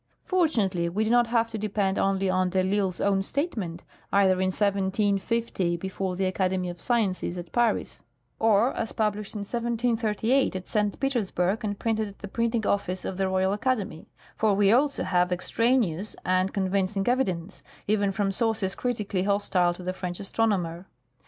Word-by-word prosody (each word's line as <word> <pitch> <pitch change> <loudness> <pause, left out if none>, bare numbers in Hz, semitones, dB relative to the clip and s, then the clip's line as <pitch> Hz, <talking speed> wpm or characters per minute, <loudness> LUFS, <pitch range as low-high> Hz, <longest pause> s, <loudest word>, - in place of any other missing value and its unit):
Fortunately 210 - +1
we 205 +5 0
do 220 - 0
not 240 -1 +4
have 230 -1 +1
to 220 - -4
depend 200 -2 0
only 195 0 +1
on 185 0 +2
de 190 +1 0
I'Isle's 190 -1 0
own 195 -1 +2
statement, 200 - -3 0.3
either 195 -1 +5
in 190 - +2
1750 200 -1 0
before 190 +1 -3
the 190 +1 0
Academy 185 -1 0
of 175 - -12
Sciences 200 -7 0
at 175 -1 -7
Paris, 240 -2 0 0.4
or 220 +3 +3
as 225 - -4
published 210 -1 -2
in 210 - -3
1738 235 +1 0
at 185 -1 -5
St. 210 -2 0
Petersburg 215 -7 0
and 205 -1 -2
printed 220 -1 0
at 200 - -12
the 205 - -8
printing 230 +1 -1
office 185 -2 -1
of 185 - -4
the 195 0 +1
Royal 190 +1 +1
Academy; 205 -7 -2 0.3
for 215 -2 +2
we 200 0 +4
also 275 +4 +2
have 180 -1 +1
ex 180 - -2
traneous 225 -6 +1
and 185 +1 +2
convincing 195 0 0
evidence, 190 -8 -1 0.2
even 205 -1 +1
from 195 0 0
sources 215 -2 0
critically 210 -6 -2
hostile 195 -3 +2
to 180 - -10
the 185 +1 -2
French 180 -1 -5
astronomer. 190 -4 -1
200 Hz, 165 wpm, -26 LUFS, 185-225 Hz, 0.4 s, either